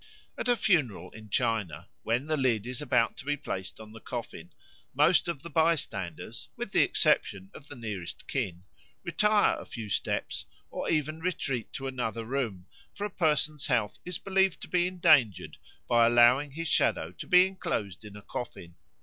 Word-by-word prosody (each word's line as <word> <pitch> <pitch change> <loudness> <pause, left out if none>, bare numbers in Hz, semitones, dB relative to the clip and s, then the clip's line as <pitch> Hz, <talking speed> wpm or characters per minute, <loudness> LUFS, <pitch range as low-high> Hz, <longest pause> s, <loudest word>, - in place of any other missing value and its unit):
At - - -4
a 245 - +4
funeral 130 - +1
in 110 -1 -12
China, 95 -7 -1
when 120 +4 0
the 155 0 0
lid 120 -7 +1
is 125 +3 -4
about 125 -5 +1
to - - -9
be 145 0 0
placed 95 -10 -5
on 110 -1 -11
the 110 - -11
coffin, 110 -10 -7 0.4
most 155 +6 +4
of 165 -4 -4
the 170 - -7
bystanders, 140 - -1
with - - -5
the - - +4
exception 95 -1 +2
of 145 - -13
the 145 - -9
nearest 105 -8 -6
kin, 90 0 -3 0.4
retire 210 +5 +3
a - - -9
few 110 -4 -7
steps - - -2 0.2
or - - -3
even 155 0 0
retreat 145 -9 -2
to 135 - -5
another 115 -3 -3
room, 115 -8 -3 0.3
for 205 - -5
a 210 - -4
person's 155 -3 +1
health 120 -7 0
is 180 -1 -3
believed 190 -2 +1
to - - -6
be 180 -1 +2
endangered 150 - +3 0.3
by 120 -1 +5
allowing 120 +4 +5
his 165 +2 -4
shadow - - +1
to - - -9
be 180 -1 +7
enclosed 110 - -4
in 105 -1 -11
a 105 - -11
coffin. 85 -8 -7
130 Hz, 175 wpm, -29 LUFS, 110-160 Hz, 0.4 s, be